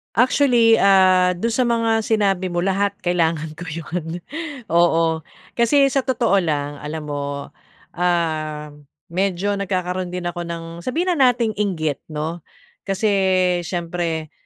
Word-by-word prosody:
Actually, 240 -2 +4
ah, 185 -2 +5
do'n 230 +7 -1
sa 245 +1 +1
mga 230 -1 +2
sinabi 195 -4 +1
mo, 175 -1 -1
lahat 200 +1 0
kailangan 165 -3 0
ko 180 - -7
'yon. 165 +1 -5 0.5
Oo, 165 -1 +3 0.4
kasi 245 +4 +4
sa 275 - +2
totoo 235 -6 +2
lang 145 -4 -2
alam 150 +1 -5
mo, 140 -1 -5 0.5
ah, 155 -4 -1 0.4
medyo 195 +2 0
nagkakaroon 185 -1 -2
din 180 0 -4
ako 175 -1 -4
ng 170 -1 -5 0.2
sabihin 330 - -1
na 265 -7 +5
nating 235 -2 -1
inggit, 160 -8 -1
'no? 160 +2 -4 0.5
Kasi 195 +2 +1 0.6
siyempre, 170 -3 -3
180 Hz, 130 wpm, -21 LUFS, 160-210 Hz, 0.6 s, ah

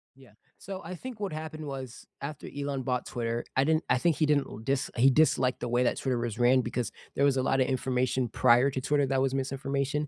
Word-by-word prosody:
Yeah. 130 -4 -18 0.3
So 195 0 -7
I 170 - -6
think 245 +3 -8
what 200 -3 -3
happened 155 0 -6
was 135 -3 -7 0.2
after 145 0 -6
Elon 140 -1 -2
bought 125 -1 -1
Twitter, 120 -1 -3
I 130 - +4
didn't 155 +2 +2
I - - +4
think 165 +4 +1
he 155 - +3
didn't 145 -2 +2
l - - -9
dis 130 +4 -1
he 130 +3 +6
disliked 130 -3 +2
the 120 - -3
way 120 +1 +2
that 120 - +1
Twitter 130 -3 -1
was 120 -2 -3
ran 125 +2 +4
because 120 -2 -3 0.2
there 140 - +1
was 140 -2 +3
a - - +2
lotta 130 -1 +2
information 130 -1 0
prior 120 +4 +4
to 130 - -3
Twitter 145 +1 +2
that 135 0 +1
was 135 -1 +1
misinformation, 140 +2 -1
135 Hz, 230 wpm, -29 LUFS, 125-145 Hz, 0.3 s, he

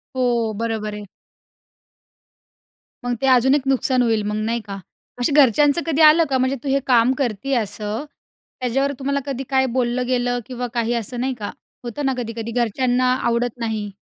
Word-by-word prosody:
हो. 240 -3 +1
बरोबर 220 -2 -2
आहे. 210 0 -7 2.0
मग 245 - 0
ते 270 - +1
अजून 260 +2 +4
एक 290 - +1
नुकसान 260 -1 +2
होईल 225 -3 +2
मग 210 - -2
नाही 230 +1 -1
का? 200 -2 -6 0.4
अशी 245 - +1
घरच्यांचं 290 +3 +4
कधी 325 -1 +1
आलं 310 +2 +7
का, 265 - +2
म्हणजे 260 +1 +1
तू 280 - -3
हे 275 +1 +2
काम 245 0 +4
करती 260 0 -2
असं 210 +1 -3 0.6
त्याच्यावर 270 +3 0
तुम्हाला 280 +1 -1
कधी 270 -2 -4
काय 265 -1 +3
बोललं 250 0 0
गेलं? 245 -1 0
किंवा 250 -1 -4
काही 235 -1 0
असं 235 +1 -3
नाही 260 +2 -1
का? 205 - -4 0.3
होतं 245 +4 -4
ना 270 - +2
कधी-कधी 230 -1 -4
घरच्यांना 245 +2 +1
आवडत 235 0 0
नाही. 220 -3 -3
245 Hz, 170 wpm, -21 LUFS, 230-265 Hz, 2.0 s, आलं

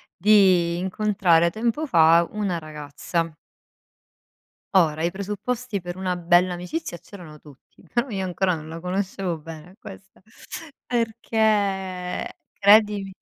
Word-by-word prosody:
di 185 -3 +4
incontrare 185 -3 +2
tempo 235 - -2
fa 165 - +5
una 200 -5 -2
ragazza. 155 +2 -4 1.4
Ora, 160 -4 +3
i 170 - +1
presupposti 210 +3 -4
per 175 0 -7
una 185 -1 -2
bella 175 +1 +3
amicizia 180 - -5
c'erano 170 -5 -13
tutti, 145 -3 -19
però 240 +3 0
io 195 -4 -3
ancora 185 0 0
non 155 0 -9
la 165 +1 -7
conoscevo 185 -1 -3
bene 160 +2 -11
a - - -18
questa, 190 -3 -13 0.7
perché, 205 -6 -1 0.2
credimi 205 -1 +4
185 Hz, 115 wpm, -23 LUFS, 170-210 Hz, 1.4 s, fa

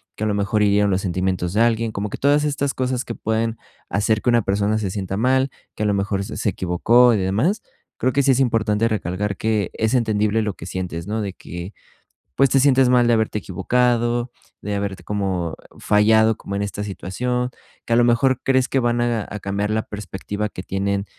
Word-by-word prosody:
que - - -5
a - - +1
lo 105 - 0
mejor 105 +2 0
hirieron 100 0 +3
los 95 0 +1
sentimientos 90 -1 -1
de 110 - +2
alguien, 115 -1 +2
como 105 0 -3
que - - -6
todas 145 +1 +3
estas 140 -1 -1
cosas 130 0 -1
que 115 - -5
pueden 110 +1 -1 0.3
hacer 105 +3 +1
que - - +1
una 120 -2 +3
persona 100 +2 +1
se 100 -3 -2
sienta 95 -1 -3
mal, 130 +4 +2 0.3
que - - -3
a - - +1
lo 105 - +2
mejor 100 0 -1
se - - -7
se - - 0
equivocó 115 +8 +3
y - - +1
demás. 110 - 0 0.3
Creo 130 0 0
que 140 - +3
sí 135 - +4
es 130 - +2
importante 115 -3 +1
recalcar 105 -2 -2
que 110 -4 0
es 110 +1 0
entendible 110 -2 +1
lo 105 -2 -2
que 85 - -10
sientes, 90 -2 -4
¿no?, 110 +1 -2
de 100 -2 -4
que, 85 +2 -8 0.6
pues, 135 - +4
te 135 - +4
sientes 135 -1 +4
mal 125 -1 +4
de - - +4
haberte 110 -1 0
equivocado, 120 +4 0 0.3
de 105 0 -3
haberte 100 -1 -4
como 95 -5 -2 0.2
fallado 110 +1 +4
como 100 - -7
en 100 - -1
esta 100 0 -4
situación, 125 +6 -3 0.3
que - - -4
a - - +5
lo 120 - +5
mejor 120 +2 +2
crees 130 -1 +2
que 135 - +1
van 120 -1 +1
a 120 -3 0
a 105 - -6
cambiar 100 +2 -2
la 110 +1 0
perspectiva 105 0 -5
que 90 - -8
tienen 100 +1 -1
105 Hz, 215 wpm, -21 LUFS, 100-120 Hz, 0.6 s, a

